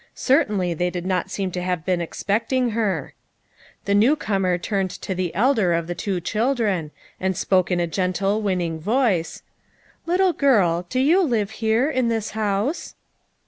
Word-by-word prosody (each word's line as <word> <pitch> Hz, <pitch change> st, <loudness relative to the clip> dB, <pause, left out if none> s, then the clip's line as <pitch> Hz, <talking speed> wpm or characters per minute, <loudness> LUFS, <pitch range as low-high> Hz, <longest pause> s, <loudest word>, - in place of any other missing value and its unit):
Certainly 210 Hz, -, +1 dB
they 180 Hz, +2 st, -1 dB
did 180 Hz, 0 st, -5 dB
not 185 Hz, 0 st, -1 dB
seem 195 Hz, -1 st, -3 dB
to 180 Hz, -, -4 dB
have 180 Hz, -3 st, -2 dB
been 180 Hz, -2 st, 0 dB
expecting 230 Hz, +8 st, -1 dB
her. 215 Hz, -3 st, -1 dB, 0.7 s
The 200 Hz, -, +1 dB
new 225 Hz, +9 st, +4 dB
comer 195 Hz, -9 st, 0 dB
turned 195 Hz, +1 st, -1 dB
to 190 Hz, -, -5 dB
the 180 Hz, -2 st, -2 dB
elder 215 Hz, -5 st, +3 dB
of 170 Hz, 0 st, 0 dB
the 175 Hz, -, -4 dB
two 185 Hz, +1 st, -2 dB
children, 215 Hz, -, 0 dB, 0.3 s
and 190 Hz, -1 st, -1 dB
spoke 185 Hz, -2 st, +2 dB
in 180 Hz, -1 st, +1 dB
a 175 Hz, -, +1 dB
gentle 195 Hz, +4 st, -1 dB
winning 180 Hz, -5 st, -1 dB
voice: 205 Hz, -, 0 dB, 0.6 s
"Little 365 Hz, +1 st, +3 dB
girl, 180 Hz, -, +2 dB
do 255 Hz, -, -1 dB
you 320 Hz, +9 st, +4 dB
live 225 Hz, -, 0 dB
here 225 Hz, +4 st, +1 dB
in 255 Hz, -6 st, 0 dB
this 225 Hz, -2 st, -1 dB
house?" 215 Hz, -, -2 dB
200 Hz, 165 wpm, -22 LUFS, 180-230 Hz, 0.7 s, new